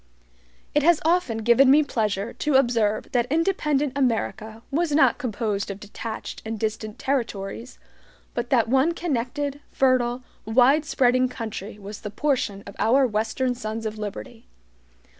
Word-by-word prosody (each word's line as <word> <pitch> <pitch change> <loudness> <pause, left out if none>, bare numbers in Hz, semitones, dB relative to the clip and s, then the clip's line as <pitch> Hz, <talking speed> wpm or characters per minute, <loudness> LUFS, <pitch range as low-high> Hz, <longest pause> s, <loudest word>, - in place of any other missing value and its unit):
It 295 - +3
has 335 +1 +4
often 320 -10 +1
given 240 +4 +5
me 295 +3 +6
pleasure 215 -5 -2
to 300 -3 -1
observe 230 -5 +2
that 245 0 0
independent 300 -5 +1
America 225 -4 -1
was 325 +2 0
not 305 - +4
composed 215 -4 -2
of 200 0 -6
detached 220 +2 -7
and 220 0 -5
distant 215 0 -3
territories, 235 -3 -3 0.6
but 240 0 -3
that 235 -4 +3
one 265 +7 +3
connected, 285 -2 -2
fertile, 255 -1 +1 0.2
wide 260 +7 +4
spreading 255 -3 +2
country 220 -3 -6
was 205 0 -9
the 210 - -5
portion 210 -5 -1
of 200 - -10
our 260 +5 +4
western 225 +3 -1
sons 225 -2 -5
of 215 0 -4
liberty. 225 +3 -7
240 Hz, 140 wpm, -24 LUFS, 220-275 Hz, 0.6 s, me